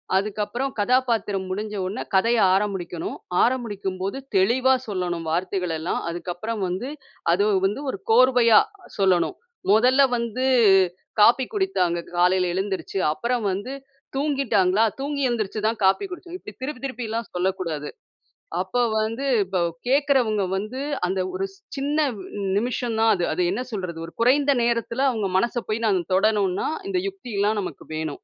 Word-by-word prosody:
அதுக்கப்புறம் 215 +6 -1
கதாபாத்திரம் 225 -5 +1
முடிஞ்ச 210 +2 -4
உடனே 200 +6 -4
கதைய 230 +4 +3
ஆரம்பிக்கணும். 190 -4 -2 0.3
ஆரம்பிக்கும் 210 -7 -1
போது, 200 +7 -2 0.2
தெளிவா 250 +7 +4
சொல்லணும். 180 -4 -2
வார்த்தைகளெல்லாம். 175 -2 -1
அதுக்கப்புறம் 180 +5 -4
வந்து 190 +10 -3 0.4
அது 190 +4 +3 0.2
வந்து 210 +8 -1
ஒரு - - -6
கோர்வையா 245 -2 +6 0.4
சொல்லணும். 190 - +2 0.4
"முதல்ல 250 +6 +5 0.2
வந்து, 235 +2 -2 0.8
காஃபி 245 +4 +6
குடித்தாங்க. 375 - +1 0.2
காலையில 180 0 +3
எழுந்துருச்சு. 190 -1 -3 0.2
அப்புறம் 235 +4 -1
வந்து 205 +8 -4 0.4
தூங்கிட்டாங்களா? 240 -9 +2 0.2
தூங்கி 280 0 -2
எழுந்திரிச்சு 215 -2 -2
தான் 225 -1 -2
காப்பி 195 - +3
குடிச்சோம்" 360 0 -7
இப்படி - - -11
திருப்பி 265 -2 -5
திருப்பிலாம் 230 -3 -4
சொல்லக்கூடாது. 175 -5 -2 0.7
அப்போ 190 +7 -1 0.2
வந்து 230 +6 -2 0.2
இப்போ 185 0 -2 0.3
கேக்கிறவங்க 260 -6 +2
வந்து 215 +7 -4 0.3
அந்த 190 +1 -1
ஒரு 190 +1 -1 0.3
சின்ன 285 +2 -1 0.2
ந் - - -10 0.4
நிமிஷம் 235 0 -1
தான் 225 0 +5
அது. 175 -2 -1
அது 180 - 0
என்ன 215 - -2
சொல்றது! 180 -5 -4
ஒரு 170 - -12
குறைந்த 280 +4 +4
நேரத்தில, 235 +1 -1
அவுங்க 215 -5 -1
மனச 235 +4 +1
போய் 225 +2 -1
நாங்க 190 -4 +2
தொடணும்ன்னா 200 -2 +2 0.2
இந்த 370 - +1
யுக்தி 375 - -9
எல்லாம் 210 +1 +2
நமக்கு - - -7
வேணும். 155 -1 -2
215 Hz, 135 wpm, -24 LUFS, 190-250 Hz, 0.8 s, கோர்வையா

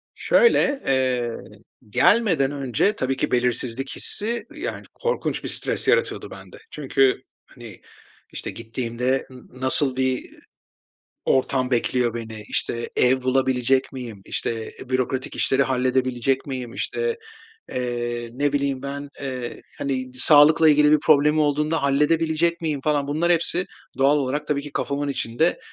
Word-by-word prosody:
Şöyle, 290 - +3
eee, 130 -3 +1 0.6
gelmeden 175 - +3
önce 140 - 0
tabii 130 +1 -1
ki, - - -1
belirsizlik 125 +1 0
hissi, 230 +3 0
ııı, 305 0 -11
yani, 370 - -5
korkunç 480 0 -1
bir - - -3
stres - - +1
yaratıyordu 475 +1 +1
bende. - - -12
Çünkü, 135 -2 +1 0.2
hani, 115 -6 -13 0.5
işte, - - -5
gittiğimde 120 +3 -3
n 130 -1 -12 0.2
nasıl 130 0 +3
bir 130 -1 -1 0.9
ortam 130 -1 +1
bekliyor 120 -1 +1
beni, 110 -2 -6
işte, 120 0 -3
ev 130 +1 +3
bulabilecek 130 0 +1
miyim? 120 -6 -8
İşte, 115 -1 -4
e, - - -10
bürokratik 130 0 -2
işleri 135 +1 +2
halledebilecek 130 0 0
miyim? 130 -3 -5
İşte, 465 0 -2 0.5
eee, 120 -1 -3
ne 145 +3 0
bileyim 140 -2 -1
ben, 140 +1 -5
eee, 130 -3 -5 0.2
hani, 130 -2 -3
d 130 - -12
sağlıkla 155 +3 +6
ilgili 150 0 +5
bir 155 - +6
problemim 150 +1 +4
olduğunda 150 +1 +1
halledebilecek 160 +4 +1
miyim 155 -4 -2
falan, 145 -2 +1
bunlar 160 +4 +1
hepsi 175 +2 0 0.3
doğal 140 +2 +4
olarak 145 +2 -2
tabii 140 -1 -1
ki 145 - -9
kafamın 145 0 -2
içinde, 140 +4 0
135 Hz, 140 wpm, -23 LUFS, 125-150 Hz, 0.9 s, sağlıkla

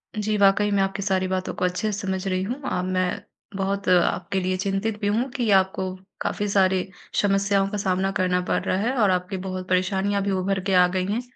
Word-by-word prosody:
जी, 215 0 -1
वाक़ई 200 +1 +4
मैं 200 -1 +2
आपकी 195 +1 -2
सारी 190 -1 +1
बातों 185 0 -2
को - - -1
अच्छे 195 +4 -1
से 200 - -3
समझ 190 -2 -3
रही 185 0 0
हूँ। 250 +8 -4
अ, 180 - -1
मैं 185 -1 -1 0.3
बहुत 195 +1 -2
आपके 180 +1 +2
लिए 185 0 -1
चिंतित 200 +2 -2
भी 205 - 0
हूँ 235 +6 0
कि 245 -4 -1
आपको 190 0 -1 0.3
काफ़ी 205 - -1
सारी 190 -1 +2 0.3
समस्याओं 195 -1 +2
का 210 - -3
सामना 190 0 0
करना 180 0 +2
पड़ - - +1
रहा 185 - 0
है। 245 +4 0
और 205 - +4
आपकी 180 +1 -1
बहुत 185 0 -5
परेशानियाँ 190 +2 +1
भी 200 - -1
उभर 190 +1 0
के - - +2
आ 180 -1 +6
गई 185 0 0
हैं। 235 +3 0
195 Hz, 215 wpm, -24 LUFS, 185-200 Hz, 0.3 s, आ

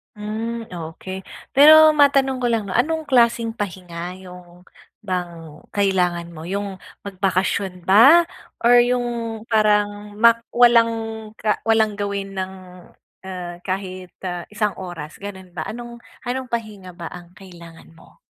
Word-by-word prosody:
Hmm, 225 +2 -5
okey. 180 +3 -7 0.3
Pero 310 +2 +8
matanong 270 -3 +3
ko - - +3
lang 220 -3 -1
'no, 185 - -4
anong 315 +5 0
klaseng 235 -3 +2
pahinga 180 -4 -5
yung 180 -1 -14 0.3
bang 175 -6 -6
kailangan 180 -4 0
mo 155 - -9
yung 195 +2 -4 0.3
magbakasyon 190 -1 -2
ba 275 - +7 0.3
or 240 +1 +6
yung 245 0 0 0.4
parang 210 -1 +1
mak 230 0 +5
walang 235 -1 +5 0.5
ka 210 0 -1
walang 220 -2 +2
gawin 200 -1 -4
ng, 190 0 -4 0.7
ah, 180 -2 -6
kahit, 185 -1 -5 0.2
ah, 175 -1 -4
isang 210 -1 -1
oras 170 -5 -8
gano'n 190 -3 -10
ba, - - -3
anong 240 +1 -8 0.2
anong 255 0 -3
pahinga 210 -5 -5
ba 170 -1 -8
ang 175 -1 -11
kailangan 170 -3 -14
mo? - - -20
200 Hz, 130 wpm, -21 LUFS, 180-235 Hz, 0.7 s, Pero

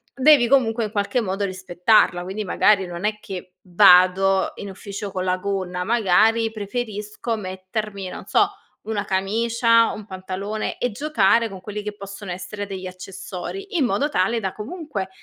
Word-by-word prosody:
devi 270 -2 +6
comunque 235 -3 +3
in 210 - -6
qualche 210 +4 0
modo 200 -1 -2
rispettarla. 185 0 +2
Quindi, 195 +4 -4
magari, 195 0 +3
non 175 +2 -5
è 210 0 -1
che 185 -1 -7 0.2
vado 185 +1 +5
in 200 - -6
ufficio 200 +1 -7
con 185 -1 -3
la 185 0 +1
gonna. 185 -2 -3
Magari 225 +1 +3
preferisco 215 +1 -4
mettermi, 195 0 -5
non - - -8
so, - - +3 0.3
una 210 -2 -3
camicia, 230 +4 +2
un 210 - -9
pantalone, 195 +2 -4
e 245 - 0
giocare 230 -3 +2
con 190 -2 -9
quelli 210 +2 -5
che 210 0 -5
possono 200 -1 -8
essere 190 +3 -6
degli 190 -2 -6
accessori. 195 - -6
In 290 - +3
modo 235 +7 0
tale 230 -2 +1
da, 190 -4 -3
comunque, 225 - -5
200 Hz, 160 wpm, -22 LUFS, 185-225 Hz, 0.3 s, devi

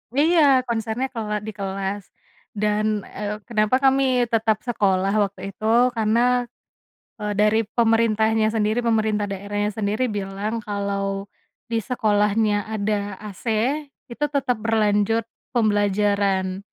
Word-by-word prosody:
Iya 325 +4 +4 0.3
konsernya 225 +2 -2
kela 215 -3 -3
di 220 - -3
kelas, 195 +1 -3 0.5
dan, 210 0 0 0.2
eee, 210 0 -6
kenapa 215 0 +2
kami 270 0 +4 0.3
tetap 220 -1 +2
sekolah 195 -4 +1
waktu 195 0 -5
itu, 215 +3 -8 0.3
karena, 240 +3 +2 0.7
eee, 210 0 -2
dari 210 +1 +4 0.2
pemerintahnya 225 -1 +3
sendiri 215 +2 +1
pemerintah 215 -3 +1
daerahnya 205 +1 -2
sendiri 215 +3 0
bilang 200 +3 -4
kalau, 200 -1 -3 0.4
di 230 - +1
sekolahnya 210 -2 +2 0.2
ada 205 -1 -1 0.2
AC 190 - -16 0.7
itu 295 +5 -1
tetap 255 -4 +1
berlanjut 220 0 +1 0.3
pembelajaran 205 -3 +1
210 Hz, 110 wpm, -23 LUFS, 200-225 Hz, 0.7 s, Iya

